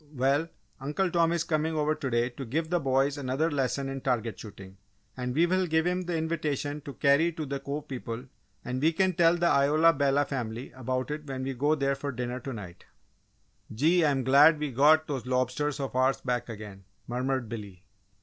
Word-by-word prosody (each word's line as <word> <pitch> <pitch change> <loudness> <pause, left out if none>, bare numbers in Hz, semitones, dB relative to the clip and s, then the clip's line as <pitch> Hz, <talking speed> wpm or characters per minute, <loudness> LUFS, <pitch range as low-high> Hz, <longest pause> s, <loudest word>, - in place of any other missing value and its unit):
"Well, 140 +5 +1 0.3
Uncle 150 +7 -1
Tom 170 -1 +3
is 170 -1 0
coming 160 -1 -1
over 155 0 +1
to 140 -3 -4
day 120 0 +1
to 130 +2 -8
give 160 +7 -2
the 175 - +2
boys 135 0 +1
another 140 +5 0
lesson 135 -1 -1
in 135 0 -5
target 120 -5 -1
shooting 100 -3 -11 0.4
and 125 0 -4
we 165 +3 +4
will 185 +1 +1
give 160 0 +1
him 180 +1 0
the 175 -1 -1
invitation 150 -3 -2
to 140 - -7
carry 145 +4 +3
to 155 -1 -4
the 140 0 -4
Cove 145 +2 -5
people, 125 -2 -6 0.4
and 125 +1 -3
we 160 +3 +3
can 185 +2 +2
tell 170 0 +4
the 175 - 0
Isola 155 +2 +4
Bella 140 0 +2
family 120 -3 -5
about 130 +2 -3
it 150 0 -5
when 130 -1 -4
we 135 +1 -2
go 145 +5 +1
there 140 -2 0
to 140 +1 -4
dinner 125 0 -4
to 135 +2 -6
night!" 95 -7 -9 0.9
"Gee! 160 +10 +3
I'm 140 -4 +2
glad 140 +5 +6
we 150 -2 -3
got 150 +5 +5
those 135 -5 -4
lobsters 130 +3 0
of 135 -2 -4
ours 130 +1 +2
back 125 -2 -2
again!" 105 -3 -9 0.2
murmured 125 0 -2
Billy. 100 -5 -8
140 Hz, 200 wpm, -28 LUFS, 125-155 Hz, 0.9 s, glad